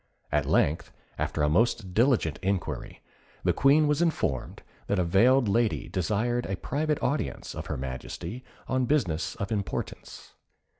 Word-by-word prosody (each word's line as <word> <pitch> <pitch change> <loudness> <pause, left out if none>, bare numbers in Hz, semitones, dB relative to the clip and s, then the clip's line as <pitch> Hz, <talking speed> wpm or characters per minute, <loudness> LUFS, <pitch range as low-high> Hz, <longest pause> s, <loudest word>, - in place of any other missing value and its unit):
At 75 -1 +1
length, 75 +3 +1 0.3
after 75 - -1
a - - +4
most 95 +3 +1
diligent 115 - +2
inquiry, 95 -2 -3 0.4
the - - +3
Queen 150 +3 +4
was 150 +2 +1
informed 155 - -1 0.2
that 100 - +1
a 90 - +3
veiled 115 +9 +4
lady 115 +2 +1
desired 110 +6 0
a 95 - -2
private 150 +6 -1
audience 145 - -2
of - - -6
her - - -3
Majesty, 65 - -6 0.2
on 130 -1 +1
business 95 - 0
of 100 +2 -4
importance. 100 -3 -5
105 Hz, 145 wpm, -28 LUFS, 85-130 Hz, 0.4 s, a